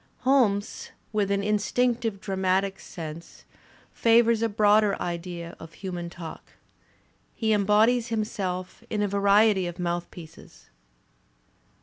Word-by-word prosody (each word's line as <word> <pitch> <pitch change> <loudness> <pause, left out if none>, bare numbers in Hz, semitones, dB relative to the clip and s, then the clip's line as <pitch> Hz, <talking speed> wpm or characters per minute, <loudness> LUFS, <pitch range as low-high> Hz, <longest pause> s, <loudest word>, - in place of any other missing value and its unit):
Holmes, 230 -7 +1 0.2
with 205 -2 +1
an 200 0 0
instinctive 225 +1 0
dra 195 0 -4
matic 190 +1 0
sense, 165 0 -9 0.5
favours 230 -1 +4
a 230 - +1
broader 210 -1 +3
idea 170 -1 -5
of 165 0 -11
human 175 -3 -6
talk. 170 -2 -10 0.8
He 220 -2 +1
embodies 215 +4 +3
himself 195 -5 -3
in 210 -1 -1
a - - +1
variety 200 -1 +3
of 175 - -7
mouthpieces. 175 -2 -6
200 Hz, 110 wpm, -26 LUFS, 180-220 Hz, 0.8 s, favours